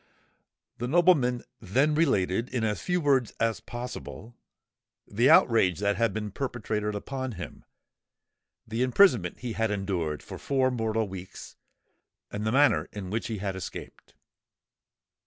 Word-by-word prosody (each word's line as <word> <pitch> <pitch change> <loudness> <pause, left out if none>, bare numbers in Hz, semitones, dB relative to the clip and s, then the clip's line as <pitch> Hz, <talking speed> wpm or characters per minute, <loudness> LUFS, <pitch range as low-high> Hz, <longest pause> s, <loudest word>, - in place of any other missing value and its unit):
The 120 - -2
nobleman 145 -6 +3 0.2
then 130 +9 +1
related, 115 - +1
in 120 -3 -2
as 105 -1 -1
few 180 0 0
words 135 -7 +2
as 115 -1 +1
possible, 120 -1 -8 0.7
the 120 +6 +2
outrage 95 -7 +5
that 100 0 +1
had 115 -2 +1
been 105 0 -4
perpetrated 105 -4 -3
upon 130 +4 -4
him—the 110 +4 -11
imprisonment 125 - +3
he 120 -2 -4
had 110 0 0
endured 95 -7 -2
for - - -9
four 130 -2 +1
mortal 110 -2 -1
weeks—and 95 +2 -10
the - - +1
manner 145 +4 +3
in 95 -3 -7
which 110 +2 -2
he 110 - -3
had 95 -1 -3
escaped. 95 - -9
115 Hz, 130 wpm, -27 LUFS, 100-130 Hz, 0.7 s, outrage